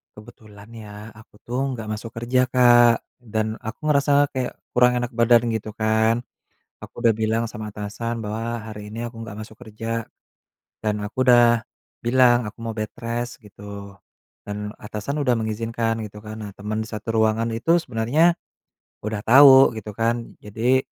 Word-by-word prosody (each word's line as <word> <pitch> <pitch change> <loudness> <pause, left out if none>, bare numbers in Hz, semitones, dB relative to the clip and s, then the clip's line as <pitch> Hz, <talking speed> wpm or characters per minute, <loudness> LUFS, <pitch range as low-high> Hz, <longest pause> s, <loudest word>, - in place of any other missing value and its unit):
kebetulan 105 -1 -14
ya, 105 -1 -10
aku 110 -1 -18
tuh 130 +3 -1
nggak 115 -3 -6
masuk 110 +1 -5
kerja 120 +3 +1
Kak. 120 -2 +6 0.2
Dan 110 -2 -3
aku 110 0 -6
ngerasa 145 0 +3
kayak 130 -1 -3 0.2
kurang 125 0 +4
enak 120 -1 -3
badan 120 0 +4
gitu 110 0 -5
kan. 110 +2 +1 0.6
Aku 120 - -10
udah 115 - +5
bilang 110 +1 0
sama 110 0 -7
atasan 115 +3 -4
bahwa 115 +2 -4
hari 105 -1 -9
ini 115 - -4
aku 120 -1 -7
nggak 115 -2 -8
masuk 110 0 -13
kerja, 115 0 -5 0.8
dan 105 -1 -1
aku 120 +5 -2
udah 120 -2 +5 0.4
bilang, 120 0 +4
aku 110 - -32
mau 115 - -4
bedrest 115 +2 -4
gitu. 100 -1 -11 0.5
Dan, 105 0 -6
atasan 105 +7 -5
udah 125 -3 +2
mengizinkan 115 +1 -2
gitu 105 0 -8
kan. 105 +1 -9
Nah 105 - -6
teman 110 +2 -3
di - - -7
satu 110 +1 -5
ruangan 110 +1 +2
itu 165 +10 +2
sebenarnya, 140 +7 +2 0.7
udah 110 0 -3
tahu 135 0 +8
gitu 110 -1 -7
kan. 115 +2 -2
Jadi, 115 +5 +1
115 Hz, 160 wpm, -23 LUFS, 110-120 Hz, 0.8 s, tahu